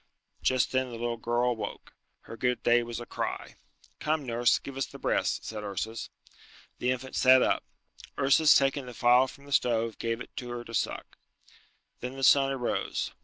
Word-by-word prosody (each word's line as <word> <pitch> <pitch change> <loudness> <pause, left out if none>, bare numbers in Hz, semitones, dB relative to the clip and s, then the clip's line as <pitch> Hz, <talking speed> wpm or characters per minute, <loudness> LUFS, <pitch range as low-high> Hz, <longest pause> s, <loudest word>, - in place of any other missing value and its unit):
Just 130 -2 +2
then 130 0 +1
the 120 - -8
little 120 0 -2
girl 120 +2 0
awoke. 110 -4 -6 0.3
Her - - -10
good 125 +1 -1
day 120 0 +4
was 120 0 -5
a 120 - -7
cry. - - -5 0.4
"Come, 155 -2 -1
nurse, 120 0 +2
give 140 - -8
her 135 - -6
the - - -4
breast," - - -1
said 110 -1 -5
Ursus. 110 +3 -4 0.7
The 125 - 0
infant 130 +1 -3
sat 130 0 +6
up. - - +1 0.5
Ursus 145 +3 +5
taking 135 -1 +2
the 125 - -9
phial 125 +2 +5
from 140 +2 -13
the 140 - -13
stove 115 -4 +1
gave 115 0 -2
it - - -10
to 125 - -5
her 120 0 -5
to 115 - -11
suck. - - -3 0.8
Then 125 +2 -6
the 135 - -5
sun 135 +1 +5
arose. 130 -3 -2
125 Hz, 185 wpm, -28 LUFS, 115-130 Hz, 0.8 s, sat